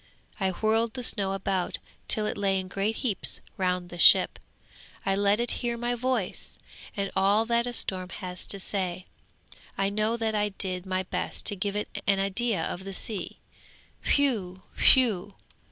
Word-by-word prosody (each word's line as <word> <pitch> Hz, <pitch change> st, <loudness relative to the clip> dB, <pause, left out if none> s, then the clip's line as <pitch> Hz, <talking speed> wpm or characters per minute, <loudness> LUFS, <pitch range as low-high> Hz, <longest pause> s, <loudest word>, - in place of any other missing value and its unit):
I 190 Hz, -1 st, +1 dB
whirled 220 Hz, +4 st, +1 dB
the 250 Hz, -, -3 dB
snow 195 Hz, -4 st, +2 dB
about 190 Hz, -2 st, -1 dB, 0.3 s
till 215 Hz, -, +5 dB
it -, -, -2 dB
lay 195 Hz, -1 st, +1 dB
in 185 Hz, -, -5 dB
great 200 Hz, +4 st, -1 dB
heaps 230 Hz, -6 st, +1 dB, 0.2 s
round 180 Hz, -2 st, -1 dB
the 175 Hz, -, -8 dB
ship. -, -, +7 dB, 0.7 s
I 195 Hz, -, +2 dB
let 200 Hz, +2 st, +2 dB
it 240 Hz, 0 st, -1 dB
hear 240 Hz, -1 st, -1 dB
my 240 Hz, +1 st, -1 dB
voice, 245 Hz, -5 st, -2 dB, 0.4 s
and 200 Hz, -1 st, -1 dB
all 200 Hz, +3 st, +3 dB
that 235 Hz, +1 st, +1 dB
a -, -, -2 dB
storm 185 Hz, -5 st, -2 dB
has 180 Hz, -2 st, -7 dB
to 200 Hz, -, -3 dB
say, 185 Hz, -2 st, -2 dB, 0.7 s
I 195 Hz, 0 st, +1 dB
know 215 Hz, +3 st, 0 dB
that 225 Hz, -1 st, -1 dB
I 210 Hz, -1 st, +1 dB
did 190 Hz, -2 st, -5 dB
my 185 Hz, 0 st, -1 dB
best 185 Hz, -, -3 dB
to 205 Hz, -, +2 dB
give 200 Hz, +1 st, -2 dB
it 210 Hz, -, -4 dB
an 200 Hz, -1 st, +4 dB
idea 195 Hz, -1 st, 0 dB
of 185 Hz, -, -5 dB
the 195 Hz, 0 st, -6 dB
sea. 210 Hz, -4 st, -4 dB, 0.8 s
Whew! 205 Hz, -10 st, 0 dB
whew!' 210 Hz, -7 st, +4 dB
200 Hz, 170 wpm, -27 LUFS, 190-225 Hz, 0.8 s, ship